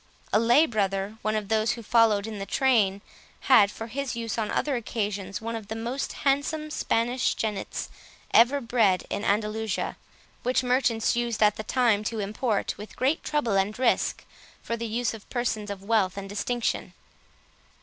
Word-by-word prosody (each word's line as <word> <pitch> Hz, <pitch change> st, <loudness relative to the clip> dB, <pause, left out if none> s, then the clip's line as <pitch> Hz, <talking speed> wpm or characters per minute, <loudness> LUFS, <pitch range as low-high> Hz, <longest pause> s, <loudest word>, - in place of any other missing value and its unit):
A 215 Hz, -, +5 dB
lay 240 Hz, +7 st, +5 dB
brother, 200 Hz, -2 st, -1 dB
one 215 Hz, 0 st, 0 dB
of 210 Hz, -2 st, -2 dB
those 220 Hz, +1 st, +2 dB
who 235 Hz, -, -8 dB
followed 220 Hz, -2 st, +3 dB
in 220 Hz, -2 st, -6 dB
the 195 Hz, -, -5 dB
train, 215 Hz, -7 st, +2 dB, 0.4 s
had, 220 Hz, -7 st, +6 dB
for 225 Hz, -, -7 dB
his 260 Hz, +2 st, -4 dB
use 230 Hz, -2 st, -3 dB
on 220 Hz, -2 st, -1 dB
other 290 Hz, -2 st, 0 dB
occasions, 205 Hz, -4 st, -3 dB
one 230 Hz, +1 st, -4 dB
of 220 Hz, -3 st, -7 dB
the 220 Hz, -, -5 dB
most 240 Hz, +5 st, -3 dB
handsome 300 Hz, +3 st, +1 dB
Spanish 240 Hz, -1 st, 0 dB
jennets 210 Hz, -3 st, -3 dB, 0.5 s
ever 250 Hz, +5 st, +6 dB
bred 225 Hz, -6 st, +2 dB
at -, -, -2 dB
Andalusia, 215 Hz, +1 st, -1 dB, 0.4 s
which 255 Hz, +1 st, +1 dB
merchants 250 Hz, -3 st, +2 dB
used 235 Hz, -2 st, 0 dB
at 210 Hz, -1 st, +4 dB
that 215 Hz, -, -6 dB
time 235 Hz, -5 st, +2 dB
to 225 Hz, +1 st, -2 dB
import, 210 Hz, +1 st, -1 dB
with 210 Hz, -, -9 dB
great 275 Hz, +5 st, 0 dB
trouble 285 Hz, -9 st, 0 dB
and 195 Hz, +2 st, 0 dB
risk, 255 Hz, -, +1 dB, 0.4 s
for 230 Hz, -, -2 dB
the 230 Hz, 0 st, -4 dB
use 235 Hz, +2 st, -1 dB
of 220 Hz, -2 st, -11 dB
persons 220 Hz, -4 st, -2 dB
of 200 Hz, -1 st, -6 dB
wealth 200 Hz, -3 st, +1 dB
and 200 Hz, 0 st, -5 dB
distinction. 230 Hz, +4 st, -2 dB
225 Hz, 170 wpm, -26 LUFS, 210-245 Hz, 0.5 s, had